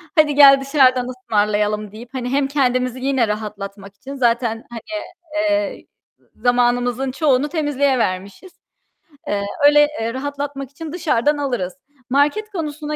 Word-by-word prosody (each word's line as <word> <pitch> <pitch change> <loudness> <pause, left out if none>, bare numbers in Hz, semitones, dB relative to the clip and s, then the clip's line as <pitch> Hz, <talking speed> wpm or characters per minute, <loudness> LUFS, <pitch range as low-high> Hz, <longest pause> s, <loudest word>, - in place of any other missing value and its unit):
"Hadi 300 -3 +4
gel 275 -1 +8
dışarıdan 260 -3 +3
ısmarlayalım." 210 -3 -1
deyip 230 +3 -11
hani 250 -1 -3
hem 275 +1 +1
kendimizi 255 -2 0
yine 265 -3 +1
rahatlatmak 200 -2 -6
için 275 +6 -9
zaten 235 -3 0
hani, 235 -2 -7 0.5
eee, 310 -1 0 0.3
z - - -31
zamanımızın 245 +1 +1
çoğunu 285 0 +1
temizliğe 285 -4 +1
vermişiz. 190 - -3 0.8
Eee, 200 -1 -1 0.2
öyle, 295 0 +6
eee, 230 +1 -2
rahatlatmak 280 0 -5
için 315 +2 -8
dışarıdan 300 -5 +1
alırız. 245 -11 -2 0.4
Market 295 +11 +1
konusuna 300 -4 -4
260 Hz, 130 wpm, -20 LUFS, 230-290 Hz, 0.8 s, gel